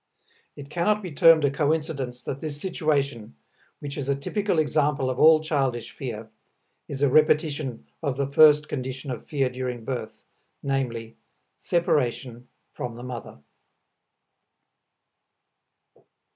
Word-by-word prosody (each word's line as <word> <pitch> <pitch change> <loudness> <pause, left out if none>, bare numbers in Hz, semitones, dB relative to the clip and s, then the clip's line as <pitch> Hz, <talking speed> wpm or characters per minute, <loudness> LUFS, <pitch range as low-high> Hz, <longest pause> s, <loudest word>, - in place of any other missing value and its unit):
It 140 0 -11
cannot 210 +5 +1
be 180 - -6
termed 160 +1 +6
a 140 - +2
coincidence 145 -4 -1
that 140 - -5
this 150 -2 -5
situation, 140 - -1 0.4
which 145 0 -6
is 140 -1 -4
a 140 - +2
typical 200 +7 -1
example 145 -3 +1
of 125 - -5
all 155 0 +7
childish 135 -7 -1
fear, 115 -4 -6 0.6
is 140 0 -4
a - - +6
repetition 150 -3 +2 0.2
of 140 -5 -2
the 140 - 0
first 150 +2 +6
condition 130 0 -5
of 125 - -6
fear 140 -3 0
during 125 -2 -5
birth, 110 -4 -5 0.4
viz., 120 -5 -2 0.4
separation 125 -7 -1 0.3
from 120 -2 -5
the 120 - -9
mother. 125 -3 -8
140 Hz, 125 wpm, -25 LUFS, 125-155 Hz, 0.6 s, all